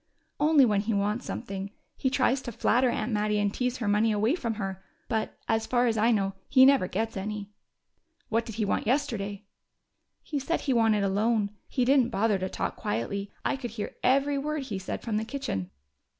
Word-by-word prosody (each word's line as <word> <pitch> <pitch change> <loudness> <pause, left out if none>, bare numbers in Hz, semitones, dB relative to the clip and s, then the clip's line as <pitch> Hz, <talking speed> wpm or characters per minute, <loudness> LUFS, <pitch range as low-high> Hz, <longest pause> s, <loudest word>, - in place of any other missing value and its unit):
"Only 295 -2 +6
when 205 -3 +2
he 220 +1 -1
wants 210 +4 -1
something. 195 -4 -5 0.3
He 260 - 0
tries 260 0 +2
to 245 - -6
flatter 250 +3 +2
Aunt 220 0 -2
Mattie 210 0 +1
and 205 -1 +1
tease 250 0 -1
her 225 - -3
money 210 +2 +3
away 215 +5 +2
from 235 -10 -2
her. 195 -2 -5 0.2
But, 220 -1 -2
as 225 0 +1
far 245 0 +2
as 230 -2 +2
I 220 +2 +3
know, 195 -4 +1 0.2
he 260 -1 +7
never 270 -8 +5
gets 225 +4 -2
any." 205 +1 -4 0.8
"What 230 +1 +1
did 225 - -6
he 220 -1 0
want 200 - -1
yesterday?" 210 -6 -1 0.8
"He 295 - -3
said 330 +5 -1
he 270 - 0
wanted 225 -3 +3
a - - +2
loan. 210 +1 +1 0.2
He 250 - 0
didn't 260 -2 +4
bother 215 -3 +1
to 185 0 -2
talk - - -3
quietly: 195 - -3
I - - +1
could 260 -3 -5
hear 205 - -4
every 275 +2 +2
word 300 0 -2
he 210 -7 -4
said 190 - -5
from 220 -3 -1
the 215 - 0
kitchen." 220 - -4
225 Hz, 205 wpm, -28 LUFS, 205-255 Hz, 0.8 s, he